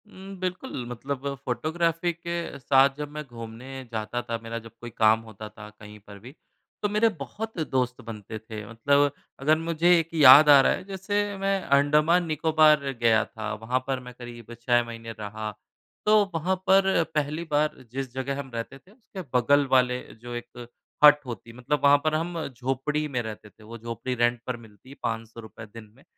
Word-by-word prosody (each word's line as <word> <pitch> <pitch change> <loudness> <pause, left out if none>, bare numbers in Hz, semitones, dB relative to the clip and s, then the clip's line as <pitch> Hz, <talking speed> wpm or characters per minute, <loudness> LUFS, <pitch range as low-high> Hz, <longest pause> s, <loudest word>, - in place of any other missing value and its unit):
उम, 195 -1 -11
बिल्कुल, 185 - -4
मतलब 140 +3 -4
फ़ोटोग्राफ़ी 165 +7 0
के 170 -2 -5
साथ 135 +1 +4
जब 150 -1 -5
मैं 150 0 -6
घूमने 120 +2 -9
जाता 110 +2 -3
था, 120 -1 -4
मेरा 115 0 -5
जब 115 0 -13
कोई 120 - -7
काम 110 -1 +3
होता 110 0 -9
था 105 0 -12
कहीं 105 0 -14
पर 100 -1 -11
भी, 125 +8 -13 0.5
तो 205 - 0
मेरे 210 +2 +3
बहुत 215 - -6
दोस्त 125 -1 -1
बनते 110 -2 -8
थे 110 -1 -8
मतलब 140 +6 +2 0.3
अगर 155 +3 +3
मुझे 165 +1 +1
1 165 0 -3
याद 150 -1 +9
आ 145 -1 +9
रहा - - +3
है, - - -5
जैसे 200 +1 -2
मैं 195 0 0
अंडमान-निकोबार 155 0 +3
गया 110 -1 +4
था, 110 0 -6
वहाँ 115 +4 -1
पर 135 -1 -1
मैं 125 - -9
करीब 120 -1 -10
6 120 0 +3
महीने 115 -1 -8
रहा, 105 +1 -5 0.5
तो 210 0 +5
वहाँ 170 +3 0
पर 190 -2 +4
पहली 150 +2 -1
बार 150 +1 +1 0.2
जिस 135 0 -4
जगह 135 +1 -3
हम 135 -1 -6
रहते 115 +3 -5
थे, 135 +8 -23
उसके 215 -4 -10 0.2
बगल 140 +4 +3
वाले 125 -1 +3 0.2
जो 120 0 -8
एक 120 0 -8 0.4
हट 150 -1 +8
होती 115 -2 -8
है 115 - -12
मतलब 145 +3 -2
वहाँ 145 0 +7
पर 155 0 +1
हम 170 +2 -2
झोंपड़ी 135 +4 -2
में 130 -4 -2
रहते 110 -2 -8
थे, 110 - -21
वो 115 +2 -9
झोंपड़ी 115 +2 -5
रेंट 120 0 +1
पर 125 -1 -2
मिलती 110 +1 -17
है 140 - -11
500 115 0 -4
रुपये 110 0 -11
दिन 110 0 -13
में 135 - -21
135 Hz, 190 wpm, -26 LUFS, 115-155 Hz, 0.5 s, याद